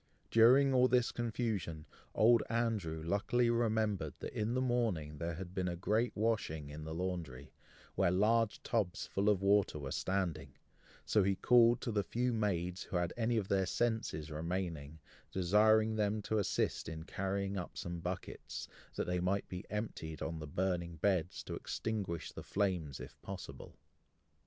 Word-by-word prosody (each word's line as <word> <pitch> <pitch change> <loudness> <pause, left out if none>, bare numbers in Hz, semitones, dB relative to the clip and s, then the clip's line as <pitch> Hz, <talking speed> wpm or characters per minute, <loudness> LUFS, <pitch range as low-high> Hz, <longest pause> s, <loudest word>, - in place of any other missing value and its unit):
During 130 +5 +6
all 125 0 +5
this 125 -2 +3
confusion, 110 -9 -2 0.3
Old 115 +1 +6
Andrew 110 -9 -1
luckily 115 +7 +2
remembered, 110 - 0
that, - - -6
in 110 +3 -1
the - - +2
morning, 110 - 0
there 85 +1 -2
had 90 +1 -7
been 95 -1 -1
a 85 - -2
great 110 +7 +1
washing 100 -10 -1
in 75 +1 -7
the 80 - -5
laundry, 85 -7 -4 0.4
where 95 - +2
large 105 +4 +2
tubs 105 -4 -1
full 100 +2 +1
of 100 -2 +2
water 100 -4 +3
were 70 -2 -5
standing, 95 -2 -2 0.5
so 105 - +3
he 95 0 +2
called 120 +2 +5
to 120 - -2
the 105 -1 +2
few 125 +3 -1
maids 90 -5 -1
who - - -6
had 85 -1 -1
any 115 0 +1
of 100 -3 -1
their 95 -2 +2
senses 110 -10 -1
remaining, 80 -2 -3 0.3
desiring 110 +4 +4
them 105 0 0
to 110 +1 0
assist 100 - 0
in 80 0 -6
carrying 100 +2 -2
up 90 -2 -5
some 85 0 -4
buckets, 90 +2 -5 0.3
that - - -1
they 90 0 0
might 95 +3 0
be 90 0 -7
emptied 80 -8 -4
on 80 0 -3
the 75 - -6
burning 85 +1 -1
beds, 90 0 0
to - - -6
extinguish 100 -7 -3
the - - -8
flames 90 -9 -1
if - - -10
possible. - - -8
95 Hz, 165 wpm, -35 LUFS, 85-110 Hz, 0.5 s, During